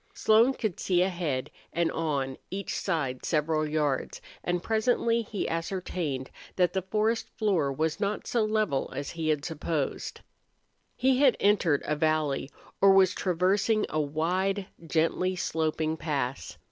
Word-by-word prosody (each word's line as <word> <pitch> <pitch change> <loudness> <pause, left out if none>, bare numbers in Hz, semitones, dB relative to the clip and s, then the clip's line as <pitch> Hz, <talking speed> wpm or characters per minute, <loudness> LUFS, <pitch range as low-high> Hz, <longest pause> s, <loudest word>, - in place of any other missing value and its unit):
Slone 225 +5 +4
could 215 -7 -3
see 180 -1 +2
ahead 160 -8 -2 0.2
and 170 -1 +1
on 140 -5 -1
each 195 +1 -4
side 145 -9 -2
several 155 0 +1
hundred 155 -1 -2
yards, 145 -4 -1 0.2
and 175 -1 -1
presently 230 +1 +2
he 210 -2 -3
ascertained 165 -5 -3 0.2
that 180 -2 +2
the 190 - 0
forest 215 +4 0
floor 185 -10 +1
was 160 +5 -1
not 205 0 -1
so 235 -2 +1
level 215 -10 0
as 140 +1 -4
he 165 -2 -2
had 150 -2 0
supposed. 160 -3 -3 0.7
He 260 0 +2
had 275 -4 +5
entered 195 -8 +3
a 150 - 0
valley 150 -3 0 0.3
or 195 0 +7
was 190 -1 +5
traversing 195 +5 +1
a 155 - 0
wide, 180 +7 0 0.2
gently 165 +4 +1
sloping 160 -2 -1
pass. 140 -5 -3
170 Hz, 145 wpm, -28 LUFS, 155-200 Hz, 0.7 s, or